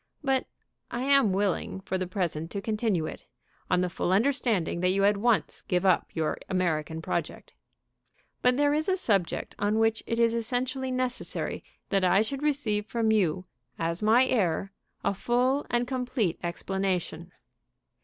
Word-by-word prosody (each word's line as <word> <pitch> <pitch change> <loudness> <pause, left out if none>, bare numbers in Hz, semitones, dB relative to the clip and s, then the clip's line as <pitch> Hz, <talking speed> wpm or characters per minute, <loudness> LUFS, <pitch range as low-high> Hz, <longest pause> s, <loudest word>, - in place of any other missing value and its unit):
But 270 -2 +1 0.4
I 245 - -3
am 275 -6 +4
willing 190 -1 -1
for 190 - -4
the 185 -1 -1
present 170 -4 -2
to 200 - -4
continue 215 -5 0
it, - - -8 0.4
on 180 - +3
the 180 - +1
full 175 - -2
understanding 220 - +1
that 180 +1 +2
you 195 +1 +2
at 205 +1 +4
once 225 +2 +1
give 180 0 -1
up 185 -3 +3
your 160 -2 -1
American 160 -3 -1
project. - - -4 0.9
"But 250 0 +3
there 290 0 +3
is 310 +4 0
a 380 - +2
subject 200 - 0
on 205 +1 +1
which 225 0 +2
it 230 - -1
is 230 -1 +3
essentially 255 +3 -1
necessary 255 -1 -2 0.3
that 195 -2 +1
I 190 +3 +4
should 270 +5 -4
receive 235 -9 0
from 225 -1 +1
you, 185 -4 +1 0.3
as 165 +2 -1
my 225 +4 +5
heir, 195 -6 0 0.3
a - - +1
full 250 +7 +1
and 240 0 +1
complete 250 -8 -1
explanation. 180 -1 -2
210 Hz, 160 wpm, -28 LUFS, 185-250 Hz, 0.9 s, my